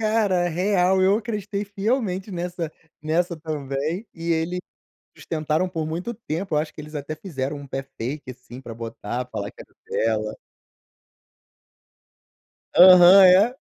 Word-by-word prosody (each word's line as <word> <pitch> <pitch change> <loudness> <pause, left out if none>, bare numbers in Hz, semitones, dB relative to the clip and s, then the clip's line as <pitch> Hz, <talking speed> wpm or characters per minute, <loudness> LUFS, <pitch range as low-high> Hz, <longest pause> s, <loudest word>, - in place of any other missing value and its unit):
Cara, 210 -5 +1
real, 185 +1 +2
eu 195 +2 +4
acreditei 210 -2 -4
fielmente 200 -1 -2
nessa 175 -2 -4 0.3
nessa 170 +3 0
também, 155 - -4
e 165 0 -4
eles 165 +2 -1 0.7
tentaram 155 +2 0
por 160 -3 -3
muito 175 +9 -4
tempo, 190 -4 -4
eu - - +3
acho 155 +1 -3
que - - -10
eles 150 +1 -11
até 145 +1 -4
fizeram 150 -5 -4
um 140 0 -9
pé 135 0 -4
fake, 135 +1 -6
assim, 125 0 -11
pra 120 -4 -9
botar, 115 +1 -5
falar 100 0 -4
que - - -13
era - - -23 0.4
dela. 110 0 -4 2.4
Aham, 185 +1 +9
é. 195 +7 +5
170 Hz, 140 wpm, -23 LUFS, 145-190 Hz, 2.4 s, Aham